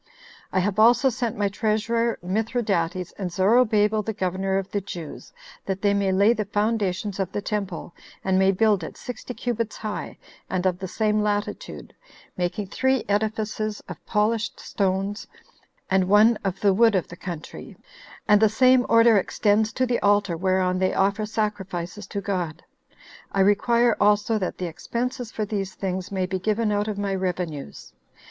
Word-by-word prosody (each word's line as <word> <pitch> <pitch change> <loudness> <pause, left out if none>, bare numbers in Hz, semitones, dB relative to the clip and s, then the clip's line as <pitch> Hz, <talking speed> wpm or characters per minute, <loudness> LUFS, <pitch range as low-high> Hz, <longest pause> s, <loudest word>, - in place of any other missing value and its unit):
I - - -1
have 205 +2 -1
also 240 +4 +5
sent 240 -1 -3
my 205 - +1
treasurer 225 +3 0
Mithridates, 185 -4 -1
and 185 -3 -3
Zorobabel, 215 +2 +3
the 220 - -3
governor 190 0 -1
of 195 -1 -2
the 205 - -1
Jews, 170 -5 -8 0.4
that 195 0 -3
they 200 -1 +3
may 200 -1 +1
lay 200 +4 +4
the 215 -3 -2
foundations 205 -1 -1
of 190 -1 -1
the - - -2
temple, 205 -5 -4 0.3
and 190 0 +2
may 190 0 +4
build 205 -2 +2
it 160 - -8
sixty 250 0 -7
cubits 230 -3 -3
high, 215 -1 -5 0.3
and 185 0 -1
of 180 -1 +1
the 190 - -4
same 215 +2 0
latitude, 210 - -3 0.4
making 180 +3 -2
three 260 +6 0
edifices 215 +1 -1
of - - -9
polished 215 +1 0
stones, 195 +1 -2 0.6
and 190 -1 +2
one 215 +3 +6
of 195 -1 -3
the 200 -2 +4
wood 225 +1 +4
of 180 - 0
the 170 - -9
country, 170 -3 -8 0.5
and 210 -1 +5
the 220 - +6
same 255 +3 +4
order 230 -1 +6
extends 215 +2 +1
to 260 - +1
the 245 -1 0
altar 205 -3 +2
whereon 185 +1 +1
they 185 0 +1
offer 200 +2 +1
sacrifices 205 -3 -3
to 200 - -4
God. 175 -5 -3 0.7
I 195 - +1
require 235 +4 +3
also 210 +2 +3
that 185 - -3
the 180 - -3
expenses 240 - -4
for 215 - -2
these 195 -2 -4
things 185 -1 -4
may 190 -2 0
be 185 0 -3
given 215 +2 0
out 205 +1 0
of 210 -2 -3
my 200 -1 -1
revenues. 180 -6 -4
205 Hz, 165 wpm, -24 LUFS, 190-220 Hz, 0.7 s, one